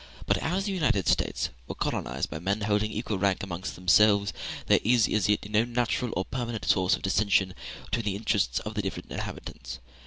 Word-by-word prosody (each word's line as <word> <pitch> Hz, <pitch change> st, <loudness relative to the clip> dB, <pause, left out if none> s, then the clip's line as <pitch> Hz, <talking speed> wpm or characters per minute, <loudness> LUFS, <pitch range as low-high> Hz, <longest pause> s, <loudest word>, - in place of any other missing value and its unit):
But -, -, +2 dB
as 185 Hz, +4 st, -1 dB
the 205 Hz, -, -1 dB
United 150 Hz, -, +1 dB
States -, -, +1 dB, 0.2 s
were -, -, -5 dB
colonized -, -, -2 dB
by 80 Hz, -, -4 dB
men 100 Hz, +5 st, -1 dB
holding 105 Hz, +1 st, +1 dB
equal 110 Hz, -2 st, -3 dB
rank 100 Hz, -1 st, +1 dB
amongst 95 Hz, -1 st, -5 dB
themselves, 100 Hz, +3 st, +4 dB, 0.3 s
there -, -, +5 dB
is 115 Hz, 0 st, +4 dB
as 105 Hz, -2 st, +1 dB
yet 105 Hz, 0 st, +1 dB
no 105 Hz, +1 st, +3 dB
natural 120 Hz, 0 st, -1 dB
or 95 Hz, -, 0 dB
permanent 120 Hz, -5 st, -4 dB
source 95 Hz, -1 st, +3 dB
of -, -, -11 dB
dissension 95 Hz, -1 st, +2 dB, 0.3 s
between 115 Hz, -2 st, -2 dB
the 100 Hz, -2 st, 0 dB
interests 105 Hz, -1 st, 0 dB
of 110 Hz, 0 st, -6 dB
its 105 Hz, -, 0 dB
different 95 Hz, -1 st, -5 dB
inhabitants. -, -, -6 dB
105 Hz, 190 wpm, -28 LUFS, 95-115 Hz, 0.3 s, there